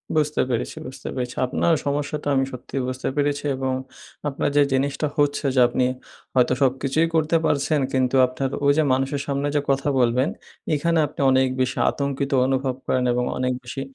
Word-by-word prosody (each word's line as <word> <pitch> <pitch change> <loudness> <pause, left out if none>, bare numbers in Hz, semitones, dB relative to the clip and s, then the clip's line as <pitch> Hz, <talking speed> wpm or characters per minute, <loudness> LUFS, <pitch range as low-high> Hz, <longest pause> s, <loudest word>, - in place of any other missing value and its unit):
বুঝতে 150 -1 +1
পেরেছি, 120 -1 -2
বুঝতে 130 - -9
পেরেছি। 125 -1 -3
আপনার 165 +6 +1
সমস্যাটা 145 +1 -2
আমি 135 0 +2
সত্যিই 130 +1 -5
বুঝতে 130 0 -4
পেরেছি 145 0 0
এবং 130 0 -1 0.5
আপনার 145 +1 -1
যে 145 - +7
জিনিসটা 140 +3 0
হচ্ছে 145 0 +1
যে, - - +4
আপনি 125 +1 0 0.5
হয়তো 125 0 +4
সবকিছুই 135 +4 +2
করতে 160 +1 +2
পারছেন। 145 +1 +1
কিন্তু 130 0 +1
আপনার 130 +1 -3 0.2
ওইযে 145 +2 +4
মানুষের 135 +2 -1
সামনে 140 +1 -1
যে, 145 - +3
কথা 135 +1 +1
বলবেন 125 +3 +2 0.4
এইখানে 165 +2 +1
আপনি 145 - -15
অনেক 130 0 +4
বেশি 130 0 -1
আতঙ্কিত 140 0 -2 0.2
অনুভব 135 -1 0
করেন। 130 - +1
এবং 125 0 0
অনেক 125 0 0
বেশি 125 +2 -6
135 Hz, 170 wpm, -23 LUFS, 130-145 Hz, 0.5 s, যে